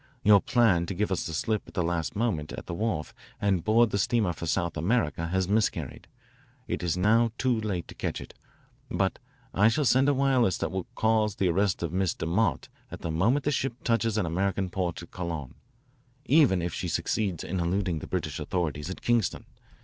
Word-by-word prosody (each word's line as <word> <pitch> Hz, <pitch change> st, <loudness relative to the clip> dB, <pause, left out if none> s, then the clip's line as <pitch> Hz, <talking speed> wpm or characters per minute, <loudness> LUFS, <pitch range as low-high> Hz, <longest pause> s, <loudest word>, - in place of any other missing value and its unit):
Your 100 Hz, -1 st, +7 dB
plan 100 Hz, -9 st, +3 dB
to 95 Hz, -, -4 dB
give 105 Hz, +2 st, -1 dB
us 95 Hz, -, -1 dB
the 80 Hz, -, -5 dB
slip 110 Hz, +6 st, 0 dB
at -, -, -14 dB
the 90 Hz, -, +1 dB
last 85 Hz, -1 st, -2 dB
moment 100 Hz, -9 st, -1 dB
at -, -, -7 dB
the -, -, -5 dB
wharf 105 Hz, -5 st, -2 dB, 0.3 s
and 95 Hz, -4 st, +1 dB
board 110 Hz, 0 st, +4 dB
the 100 Hz, -, 0 dB
steamer 105 Hz, -2 st, +1 dB
for 85 Hz, -, -6 dB
South 85 Hz, +1 st, 0 dB
America 85 Hz, -, 0 dB
has 95 Hz, +1 st, 0 dB
miscarried. 105 Hz, +2 st, -1 dB, 0.6 s
It -, -, -2 dB
is 90 Hz, -1 st, -1 dB
now 110 Hz, +5 st, +4 dB
too 125 Hz, -4 st, +1 dB
late 95 Hz, -5 st, -3 dB
to -, -, -10 dB
catch -, -, -3 dB
it, -, -, -10 dB, 0.6 s
but -, -, 0 dB, 0.3 s
I 105 Hz, +3 st, +5 dB
shall 140 Hz, +6 st, +2 dB
send 130 Hz, +3 st, +4 dB
a 145 Hz, -, +2 dB
wireless 130 Hz, -7 st, +2 dB
that -, -, -2 dB
will 95 Hz, -2 st, -3 dB
cause 110 Hz, -2 st, +2 dB
the 95 Hz, -2 st, +1 dB
arrest 95 Hz, 0 st, +1 dB
of 85 Hz, -1 st, -3 dB
Miss 95 Hz, -2 st, 0 dB
DeMott 90 Hz, +4 st, 0 dB, 0.2 s
the 85 Hz, -, -5 dB
moment 115 Hz, -, +2 dB
the 150 Hz, -, +2 dB
ship 135 Hz, -3 st, -1 dB
touches 115 Hz, -2 st, +1 dB
an 105 Hz, -, +1 dB
American 95 Hz, +2 st, -1 dB
port 90 Hz, -2 st, -2 dB
at -, -, -13 dB
Colon, 85 Hz, -7 st, -5 dB, 0.7 s
even 130 Hz, -, +4 dB
if 85 Hz, -3 st, -3 dB
she -, -, -3 dB
succeeds 95 Hz, -7 st, -1 dB
in 95 Hz, +1 st, -3 dB
eluding 90 Hz, -1 st, 0 dB
the -, -, -8 dB
British -, -, -3 dB
authorities 80 Hz, -3 st, -2 dB
at 95 Hz, -, -7 dB
Kingston. 120 Hz, -6 st, +1 dB
95 Hz, 200 wpm, -27 LUFS, 85-115 Hz, 0.7 s, Your